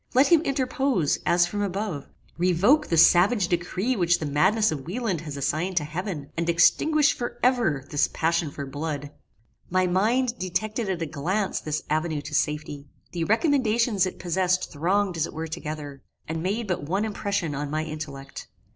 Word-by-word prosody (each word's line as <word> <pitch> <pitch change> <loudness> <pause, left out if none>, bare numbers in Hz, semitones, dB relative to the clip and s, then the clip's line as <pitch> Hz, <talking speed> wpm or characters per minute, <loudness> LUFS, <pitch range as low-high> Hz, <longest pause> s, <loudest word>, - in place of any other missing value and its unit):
Let 265 +3 +5
him 335 -3 +6
interpose, 265 - 0
as 175 0 +4
from 205 +4 -4
above; 195 -6 -3 0.3
revoke 185 - +3
the 165 - 0
savage 180 +4 +5
decree 180 +8 -1
which 175 -4 +2
the 155 - -4
madness 190 +10 +2
of 145 -2 -5
Wieland 195 -4 -2
has 150 -3 -7
assigned 160 +6 -1
to 155 - +3
heaven, 160 -1 -5
and 170 +1 -1
extinguish 300 - +4
for 240 0 -5
ever 230 - +2
this 145 - +2
passion 165 -1 0
for 140 0 -6
blood! 145 +1 -5 0.6
My 185 +1 +2
mind 230 +7 +1
detected 200 +4 -2
at 175 -3 -1
a - - -1
glance 185 +8 -2
this 155 0 -3
avenue 155 -1 -1
to - - -8
safety. 150 -1 -2 0.2
The 170 -2 -2
recommendations 230 - +2
it - - -7
possessed 185 +1 0
thronged 180 +4 0
as 160 - 0
it - - -11
were 160 +1 -4
together, 150 -3 -6 0.3
and 160 0 -3
made 205 +6 -1
but 180 -4 -1
one 190 +9 -1
impression 200 -6 -2
on 145 +1 -3
my 155 +1 -1
intellect. 150 -3 -7
175 Hz, 175 wpm, -25 LUFS, 155-210 Hz, 0.6 s, him